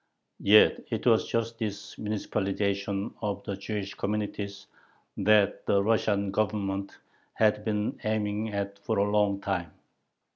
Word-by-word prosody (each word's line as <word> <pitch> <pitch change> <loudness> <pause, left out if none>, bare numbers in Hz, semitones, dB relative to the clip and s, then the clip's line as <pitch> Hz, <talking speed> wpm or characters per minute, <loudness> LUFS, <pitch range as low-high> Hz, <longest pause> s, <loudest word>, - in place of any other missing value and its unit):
Yet 105 +2 +6
it - - -3
was - - +4
just 115 0 -2
this 105 -3 -4
"municipalization" 100 -1 -1
of 100 -2 -2
the 100 - -3
Jewish 100 0 -4
communities 100 -1 -3 0.5
that 105 0 +3
the 100 0 +3
Russian 100 -2 +1
Government 100 -2 -1 0.4
had 105 -1 +3
been 105 -1 -1
aiming 110 0 -1
at 100 0 -3
for 100 - -2
a 100 +1 +2
long 105 -1 +2
time. 90 -6 -2
100 Hz, 130 wpm, -28 LUFS, 100-105 Hz, 0.5 s, Yet